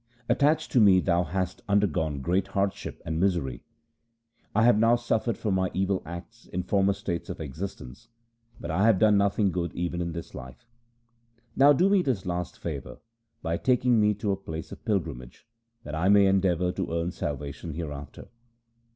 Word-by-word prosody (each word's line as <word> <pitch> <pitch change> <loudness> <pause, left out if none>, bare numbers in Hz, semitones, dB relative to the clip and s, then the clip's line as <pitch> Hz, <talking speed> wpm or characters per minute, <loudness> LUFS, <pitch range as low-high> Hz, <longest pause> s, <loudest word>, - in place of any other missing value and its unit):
Attached 150 +6 +2
to 125 - +4
me 100 -4 +6
thou 90 -1 +2
hast 90 +2 -3
undergone 80 -8 +1
great 90 +4 +1
hardship 100 0 -2
and 80 0 -2
misery. 85 -10 0 0.9
I 110 - +4
have 120 -2 +5
now 115 +2 +5
suffered 120 -2 -1
for 105 - -2
my 95 -1 +1
evil 95 0 0
acts 85 +8 -9
in 90 0 -3
former 100 +1 +2
states 85 -3 -4
of - - -6
existence, 80 - -7 0.5
but 85 - -5
I 95 +7 +2
have 110 -4 +5
done 105 +1 +4
nothing 100 0 +2
good 85 -1 -2
even 85 0 -2
in 85 -1 -3
this 85 -1 -7
life. 65 - -10 0.9
Now 140 +2 +7
do 175 +7 +4
me 200 -1 +4
this 125 - -1
last 90 -1 -3
favour 75 -5 -6 0.5
by 85 +1 -1
taking 125 -2 +2
me 105 0 +3
to 105 0 -2
a - - +1
place 80 -4 -7
of - - -10
pilgrimage, 80 - -3 0.4
that 75 - -8
I 85 +5 +1
may 100 0 +6
endeavour 90 -2 +2
to 95 -2 -4
earn 85 +1 -1
salvation 75 0 -5
hereafter.' 75 -4 -7
95 Hz, 175 wpm, -27 LUFS, 85-105 Hz, 0.9 s, Now